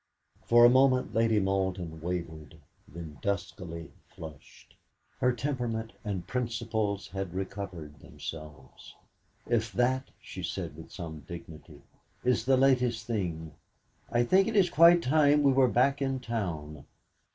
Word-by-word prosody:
For 120 0 +7
a - - +9
moment 130 0 +3
Lady 115 -1 +3
Malden 95 -4 -2
wavered, 85 -4 -5 0.3
then 80 -3 -9
duskily 90 -5 -4 0.2
flushed; 80 -3 -12 0.5
her 125 - +3
temperament 120 -4 -3
and 100 -5 -3
principles 115 -3 -2
had 95 -2 -5
recovered 95 -6 -6
themselves. 75 -3 -10 0.5
"If 115 -1 0
that," 130 +2 +1
she - - -9
said 85 -6 -4
with 80 +1 -12
some 80 -4 -7
dignity, 80 -3 -10 0.4
"is 125 -2 +1
the 135 0 +4
latest 125 -3 +2
thing, 85 -9 -3 0.6
I 120 0 +3
think 190 - +4
it 225 - -2
is 185 -4 +4
quite 170 +2 +7
time 145 +1 +4
we 140 - +5
were 130 -1 +5
back 135 +4 +2
in 135 -1 0
town." 85 - -4
105 Hz, 130 wpm, -29 LUFS, 85-125 Hz, 0.6 s, a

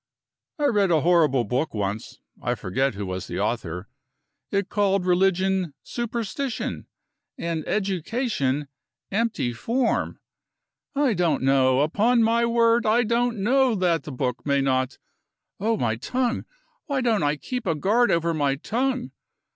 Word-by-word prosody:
I 295 - 0
read 205 -8 +3
a 160 -3 +3
horrible 155 -7 +3
book 125 +6 -2
once 105 +1 -4 0.2
(I - - 0
forget 130 +6 -1
who 100 0 -4
was 95 0 -4
the - - -4
author); 90 +4 -2 0.6
it 200 -1 0
called 200 -2 +1
religion 185 -2 +2
superstition, 235 +1 -3 0.5
and 165 -2 -2
education 190 - -1 0.4
empty 215 - 0
form. 235 - -1 0.8
I 275 -4 +3
don't 170 -7 +1
know; 130 -1 +4
upon 220 +10 +3
my 230 +1 +3
word 230 0 +3
I 230 +3 +4
don't 235 -2 0
know 260 +1 +3
that 175 -5 +1
the 150 - -8
book 125 -1 -2
may 140 -1 +2
not 130 -1 0 0.6
Oh, 220 +3 +1
my 115 - 0
tongue! 250 - -1 0.4
Why 280 -3 0
don't 230 -5 +2
I 145 0 +1
keep 245 - -5
a 165 - +2
guard 215 +11 +2
over 170 0 +1
my 145 -3 +1
tongue? 250 - -2
190 Hz, 140 wpm, -24 LUFS, 140-235 Hz, 0.8 s, know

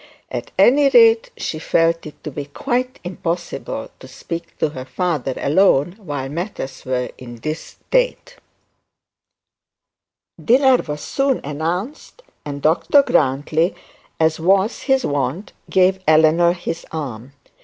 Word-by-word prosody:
At - - -5
any 280 +2 +5
rate 460 - +5
she 155 - -4
felt 165 0 +1
it 150 - -14
to 150 - -5
be 145 +1 -5
quite 250 - -2
impossible 175 -1 -4
to - - -12
speak 170 0 -7
to - - +1
her 130 -3 -7
father 150 -5 -2
alone 155 0 +3
while 145 -9 -5
matters 165 -2 -5
were 125 -1 -2
in 120 -2 -9
this 155 +7 -4 0.3
state. - - 0 2.1
Dinner 260 +2 +5
was 150 -8 -5
soon 275 -1 0
announced, 175 - -4 0.2
and 140 -1 -6
Dr 170 - +4
Grantly, 150 - +1 0.4
as 160 0 +2
was 195 +6 +2
his 265 -2 +1
wont, 145 +7 -2 0.2
gave 190 0 +3
Eleanor 160 +2 +5
his 170 -1 -5
arm. 135 -5 -6
165 Hz, 125 wpm, -20 LUFS, 145-215 Hz, 2.1 s, any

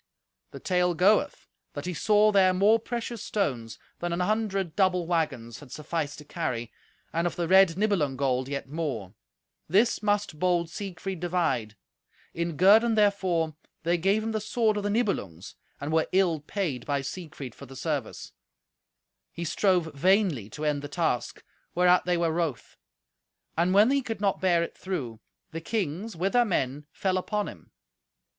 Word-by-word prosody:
The - - -10
tale 180 -1 +1
goeth 195 +5 +2 0.3
that - - -6
he 180 - -2
saw 210 +5 +4
there 190 -2 +4
more 210 +4 +4
precious 235 0 -5
stones 125 - -2 0.2
than 175 0 -2
an 170 - -1
hundred 195 -4 -1
double 185 -3 +2
waggons 150 -9 -2
had 145 -4 -14
sufficed 150 0 -3
to 150 - -11
carry, 125 -8 -3 0.4
and 170 +1 +1
of 175 - -4
the 170 -1 -2
red 190 -2 +5
Nibelung 185 -11 +1
gold 130 -1 0
yet 140 -1 -4
more. 135 - -4 0.6
This 210 +8 +3
must 205 -6 0
bold 175 -2 +1
Siegfried 190 -1 -5
divide. 165 -11 -1 0.6
In 170 -2 -3
guerdon 220 +5 +6
therefor 190 -6 +2 0.3
they 170 +1 +1
gave 195 +5 +2
him 225 - -2
the 215 -1 -2
sword 220 0 +1
of 205 - -1
the 205 - -2
Nibelungs, 195 - -2 0.3
and 145 +2 -4
were 160 0 +2
ill 180 -4 +3
paid 150 - -3
by 140 -1 0
Siegfried 145 -4 -7
for - - -12
the 135 - -12
service. 140 -3 -4 1.0
He 170 - -6
strove 175 -2 +1
vainly 175 - +2
to 150 +7 -6
end 145 -1 0
the 145 - -6
task, 145 -6 -2 0.3
whereat 180 0 +4
they 180 -1 +1
were 170 -1 +1
wroth. 160 -6 -3 0.8
And 175 +3 +2
when 205 +6 +5
he 280 0 +2
could 225 -5 -5
not 200 -2 0
bear 175 -3 +3
it - - -6
through, 130 - -5 0.3
the 165 0 -5
kings, 200 +2 -3
with 185 +4 -1
their 245 0 +5
men, 145 - -2
fell 185 +1 0
upon 210 +2 -2
him. - - -11
175 Hz, 165 wpm, -27 LUFS, 150-200 Hz, 1.0 s, guerdon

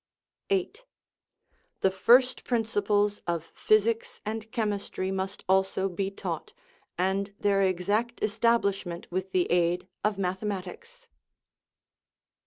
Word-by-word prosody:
8. 400 +4 -1 1.0
The 190 - +4
first 250 +7 +4
principles 210 -3 +1
of 170 -2 -1
physics 215 +5 +1
and 220 +1 -4
chemistry 205 -5 -2
must 190 +1 -3
also 190 0 +2
be 190 +1 -2
taught, 185 -5 -5 0.4
and 190 +2 0
their 200 -1 +2
exact 205 +6 0
establishment 200 -5 +1
with 185 +1 -3
the 185 -1 +2
aid 175 +1 +2 0.2
of 210 -1 +1
mathematics. 200 - -4
200 Hz, 100 wpm, -28 LUFS, 185-220 Hz, 1.0 s, The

